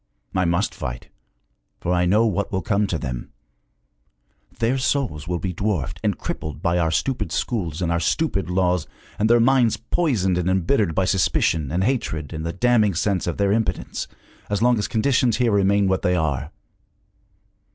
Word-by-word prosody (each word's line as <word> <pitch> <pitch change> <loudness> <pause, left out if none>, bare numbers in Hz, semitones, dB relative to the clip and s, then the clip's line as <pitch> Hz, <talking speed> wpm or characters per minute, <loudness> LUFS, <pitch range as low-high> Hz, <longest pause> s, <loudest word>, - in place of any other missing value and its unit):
I 95 -1 +1
must 85 +4 0
fight, 60 0 -6 0.7
for 90 - -1
I 90 0 +2
know 105 +5 +4
what 100 -2 -1
will 95 -1 -1
come 105 0 +1
to 85 - -1
them! 60 -5 -5 1.3
Their 120 +3 +1
souls 125 - -1
will 90 0 -1
be 90 +1 -3
dwarfed 95 -8 -2
and - - 0
crippled 75 -1 -5
by 85 0 +1
our 80 -1 +2
stupid 130 +11 -1
schools 90 - -2
and 85 - 0
our 85 - +1
stupid 95 - 0
laws, 90 -2 +1 0.3
and 110 +1 +2
their 120 0 +6
minds 120 -1 +3
poisoned 115 - 0
and 90 +1 0
embittered 95 - +1
by 95 - +2
suspicion 80 -5 +1
and 90 +3 0
hatred 85 - -2
and 80 0 -4
the 85 - -2
damning 110 -1 +2
sense 95 +1 0
of 85 - -2
their 100 -1 +2
impotence, 110 +1 -1 0.4
as 105 -1 0
long 120 -1 +3
as 105 - -1
conditions 120 0 +2
here 120 -2 +2
remain 100 0 +3
what 95 0 +1
they 90 - +1
are! 75 -4 -1
95 Hz, 175 wpm, -22 LUFS, 85-110 Hz, 1.3 s, their